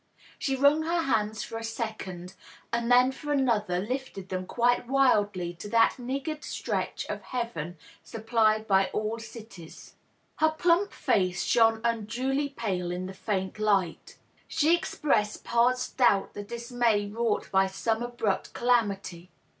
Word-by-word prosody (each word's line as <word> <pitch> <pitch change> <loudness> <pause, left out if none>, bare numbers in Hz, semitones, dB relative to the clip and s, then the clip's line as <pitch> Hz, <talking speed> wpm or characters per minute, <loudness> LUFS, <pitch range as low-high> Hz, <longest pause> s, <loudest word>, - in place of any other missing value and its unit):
She 270 - 0
wrung 285 +3 +4
her 335 +1 0
hands 220 -5 0
for 225 - -6
a - - -8
second 215 -6 -5 0.4
and 235 +1 0
then 250 +1 +6
for 295 +2 -6
another 230 -10 +1
lifted 205 -2 -4
them 185 -1 -3
quite 245 0 +1
wildly 205 -10 +2
to 175 +4 -9
that 230 +3 +3
niggard 275 +5 -4
stretch - - -3
of - - -5
heaven 180 -10 -4 0.3
supplied 220 -1 +1
by 195 -1 +4
all 215 +2 -2
cities. 220 -7 -11 0.4
Her 315 - +4
plump 345 +5 +2
&ce 185 -3 0
shone 225 -2 +3
unduly 240 +5 -1
pale 195 -9 -3
in 180 +1 -3
the 190 - -7
faint 190 0 -3
light. 200 -5 0 0.3
She 320 +1 +3
expressed 225 -10 -1
past 245 +2 +1
doubt 205 -7 +3
the 205 - -6
dismay 235 -1 0
wrought 220 +1 -2
by 190 0 +4
some 220 +4 -1
abrupt 240 -4 -2
calamity. 200 -7 0
225 Hz, 140 wpm, -28 LUFS, 200-250 Hz, 0.4 s, then